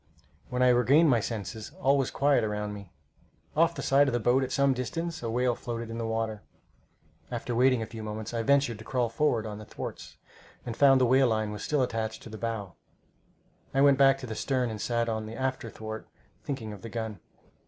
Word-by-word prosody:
When 125 0 +1
I 125 - +6
regained 135 +6 +5
my 120 - +4
senses, 110 0 -5
all 135 +2 +4
was 135 -2 +1
quiet 140 -2 +2
around 105 -1 -2
me. 100 -3 -10 0.6
Off 165 +2 +3
the - - -5
side 140 +1 +4
of 130 - 0
the - - +1
boat, 125 +4 +3
at 130 - -4
some 140 0 +3
distance, 165 +7 -4
a 115 - -3
whale 125 +2 +1
floated 115 -1 -5
on 115 - -5
the 115 - -2
water. 110 -1 -2 0.9
After 120 0 -4
waiting 125 0 +3
a - - -4
few 110 0 -9
moments, 110 +1 -5
I 115 - 0
ventured 135 -3 +2
to - - -9
crawl 125 -1 0
forward 115 -2 +1
on 105 -1 -6
the 105 - -9
thwarts, - - -8 0.5
and 120 - -4
found 135 0 +6
the 130 - +4
whale 130 +2 +5
line 110 -2 0
was 105 0 -6
still 150 -3 +1
attached 110 -2 -3
to - - -10
the 110 0 -8
bow. 110 -5 -3 1.0
I 135 - +4
went 140 -1 +5
back 135 0 +6
to 135 - -8
the 110 - -5
stern 125 0 -1
and 105 -1 -6
sat 115 -1 0
on 110 -1 -2
the 110 - -7
after 130 -2 -2
thwart, 110 0 -7 0.4
thinking 115 -7 -4
of 100 - -11
the 115 - -7
gun. 110 -4 -4
120 Hz, 220 wpm, -28 LUFS, 110-135 Hz, 1.0 s, I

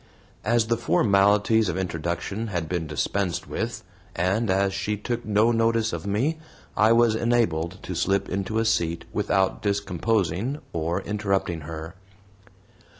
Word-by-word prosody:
As 115 +1 +2
the 115 +1 0
formalities 105 -1 +3
of 90 - -2
introduction 90 +4 -3
had 85 -6 -3
been 85 -1 -2
dispensed 85 +5 -1
with, 115 0 -4 0.3
and 95 +6 +1
as 95 +1 +2
she 105 +2 -2
took 120 +3 -3
no 110 +2 +3
notice 115 -1 +1
of 85 +3 -4
me, 130 +11 0 0.4
I 110 +2 +4
was 115 -1 +5
enabled 110 -8 +1
to 90 - -5
slip 95 +3 +1
into 100 +3 -2
a 115 - +2
seat 85 -6 0
without 95 -1 +1
discomposing 100 - 0 0.2
or 85 +3 -1
interrupting 100 -5 -1
her. 80 +2 -7
100 Hz, 140 wpm, -25 LUFS, 90-110 Hz, 0.4 s, was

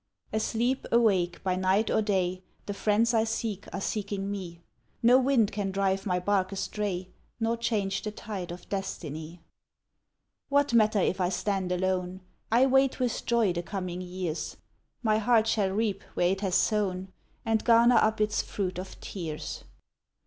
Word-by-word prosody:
Asleep, 235 +4 0
awake, 195 -7 +2
by 185 -1 +1
night 190 +4 +2
or - - +3
day. 185 -3 0 0.2
The 205 - -3
friends 215 +3 +2
I 220 -1 +4
seek 220 -3 -3
are - - -4
seeking 200 -1 -3
me; 180 -4 -6 0.4
No 245 +2 +7
wind 255 -5 +3
can 200 -1 -2
drive 195 0 0
my 180 -1 +1
bark 190 0 +1
astray, 190 -1 -3 0.3
Nor 230 0 +1
change 205 -4 -1
the 215 - -3
tide 200 -4 -6
of 175 0 -9
destiny. 170 -4 -5 1.1
What 285 -2 +2
matter 215 -2 +4
if 190 0 +1
I 180 - +2
stand 190 -1 -1
alone? 185 0 -1 0.3
I 240 +3 +5
wait 270 0 +3
with 250 -3 -1
joy 230 -6 +3
the 175 - -2
coming 180 -1 -4
years; 180 -3 -4 0.5
My 215 -1 +3
heart 225 0 +4
shall 210 -3 +1
reap 200 0 -1
where 175 - +3
it 195 +1 -2
has 190 -3 0
sown, 190 -1 +1 0.4
And 225 -1 +1
garner 235 +1 +6
up 215 0 +2
its 210 0 +1
fruit 185 -3 -3
of 185 - -8
tears. 160 -6 -6
200 Hz, 160 wpm, -28 LUFS, 185-220 Hz, 1.1 s, No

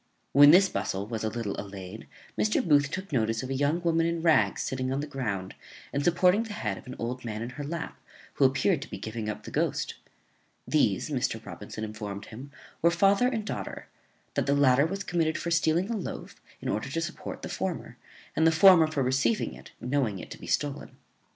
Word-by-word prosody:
When 145 +1 +9
this 185 +5 +7
bustle 95 - -2
was 110 0 -4
a 110 - 0
little 110 -3 -3
allayed, 100 +1 -9 0.3
Mr. 210 -3 +1
Booth 145 -2 +4
took 190 +3 -5
notice 115 -3 0
of 130 - -5
a - - +1
young 145 +5 +1
woman 165 -1 +2
in 170 -1 -2
rags 160 -2 +3
sitting 130 -1 -2
on 135 - -1
the 145 - -2
ground, 105 -10 -4 0.4
and 140 - 0
supporting 180 +5 +4
the 225 -2 -5
head 105 - -3
of - - -16
an 130 - -7
old 125 +2 -4
man 110 -1 -4
in 120 - -5
her 145 +3 -6
lap, 165 +3 -5 0.3
who 140 - +3
appeared 135 +5 +2
to 145 - -8
be - - -6
giving 110 -1 -5
up 105 - -5
the - - -9
ghost. - - -1 0.7
These, - - +1
Mr. - - -1
Robinson 110 - -7
informed 105 -2 -6
him, 130 +5 -10 0.3
were 170 - +5
father 195 +7 +4
and 225 -4 -2
daughter; - - -5 0.4
that - - -1
the 140 - +3
latter 140 +1 +4
was 195 +3 -4
committed 165 -3 0
for 170 - -3
stealing 170 +5 +2
a - - 0
loaf, 200 - -6 0.2
in - - -3
order 110 +6 -2
to 160 +5 -2
support 165 - -6
the - - -3
former, - - -4 0.4
and 160 - +4
the - - +6
former 165 0 +7
for 150 -3 -1
receiving 135 - +1
it, - - -12
knowing 125 -5 0
it - - -9
to - - -8
be - - -10
stolen. 145 -1 -2
140 Hz, 210 wpm, -28 LUFS, 115-170 Hz, 0.7 s, When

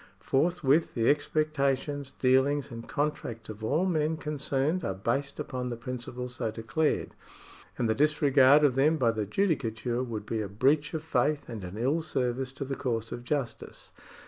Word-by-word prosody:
Forth 170 +6 0
with 145 +5 +3
the 115 -1 +1
expectations, 145 -2 0
dealings, 135 +2 +2
and 115 0 -8
contracts 140 -7 -3
of 110 0 -8
all 160 +11 +1
men 160 -3 +1
concerned 150 +2 -1
are 95 - -2
based 135 +8 -2
upon 125 -1 -3
the 120 - -3
principles 125 +1 -6
so - - -1
declared, 115 +8 -1 0.6
and 120 - +1
the 110 - +3
disregard 145 0 +5
of 145 -3 +5
them 150 +5 +3
by 120 -5 +3
the 110 -2 -3
judicature 120 - 0
would 115 -5 -4
be 110 0 -2
a 100 - -4
breach 140 - +1
of 155 - -3
faith 150 -1 0
and 110 -4 -6
an 90 +3 -7
ill 135 +8 +1
service 130 -4 -1
to 140 +1 -5
the 135 +1 -3
cause 115 -4 -2
of 120 - -6
justice. 135 -2 -4
135 Hz, 170 wpm, -29 LUFS, 120-150 Hz, 0.6 s, disregard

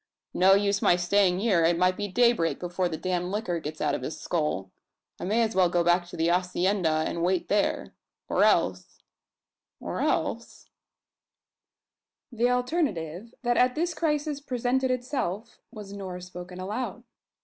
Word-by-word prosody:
"No 190 +1 +5
use 200 0 +1
my - - +5
staying 180 +1 +2
here! 195 -7 +3
It 170 +1 +3
might 180 +1 +3
be 205 +1 -3
daybreak 235 -5 +2
before 180 0 -1
the 160 - -4
damned 180 0 -2
liquor 200 -5 -2
gets 155 0 -7
out - - +1
of - - -2
his 140 +5 -5
skull. 150 - -2 0.5
I - - -4
may 220 +5 +2
as 225 0 -1
well 185 -2 +4
go 175 0 +1
back 175 +1 +2
to - - -9
the 165 +1 +2
hacienda 180 -2 +1
and 170 - -3
wait 180 +1 0
there; 205 0 0 0.3
or - - +2
else - - +1 0.8
or - - -5
else - - -2 0.8
" - - -65
The 240 +1 +1
alternative, 235 - -2
that 240 -1 +1
at 250 0 +3
this 340 +2 -1
crisis 300 -3 -1
presented 255 -1 0
itself, 245 -4 -3
was 210 -4 -9
nor, 190 -3 -6
spoken 180 0 -9
aloud. 210 +7 -4
190 Hz, 160 wpm, -27 LUFS, 175-235 Hz, 0.8 s, No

